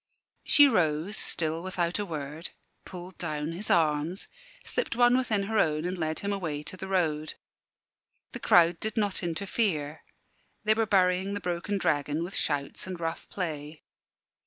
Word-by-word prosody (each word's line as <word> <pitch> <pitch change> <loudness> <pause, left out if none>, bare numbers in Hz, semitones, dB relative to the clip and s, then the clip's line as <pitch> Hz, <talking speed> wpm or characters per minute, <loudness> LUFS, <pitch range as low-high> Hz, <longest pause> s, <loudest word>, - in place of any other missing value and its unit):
She 290 -1 +7
rose, 175 - +1
still 160 -4 -2
without 180 0 -1
a 205 - -1
word, 155 0 -5 0.4
pulled 180 0 -9
down 155 -1 -3
his 185 +5 -3
arms, 160 +2 +1 0.4
slipped - - -2
one 245 0 +5
within 230 -6 +1
her 220 +2 0
own, 155 +1 +1
and 180 +1 -1
led 160 -2 -2
him 200 0 -1
away 160 -7 -3
to 170 - -5
the 190 +1 -7
road. 155 -5 0 1.0
The - - -6
crowd 170 0 +5
did 220 0 -3
not 205 -3 0
interfere; 165 -4 -1 0.6
they 215 0 +4
were 220 0 0
burying 190 0 +2
the - - -2
broken 180 +2 -2
dragon, 150 -2 0
with 180 +3 -6
shouts 145 +3 -1
and 185 -2 -5
rough 165 0 -4
play. 155 -4 -5
175 Hz, 160 wpm, -28 LUFS, 155-200 Hz, 1.0 s, She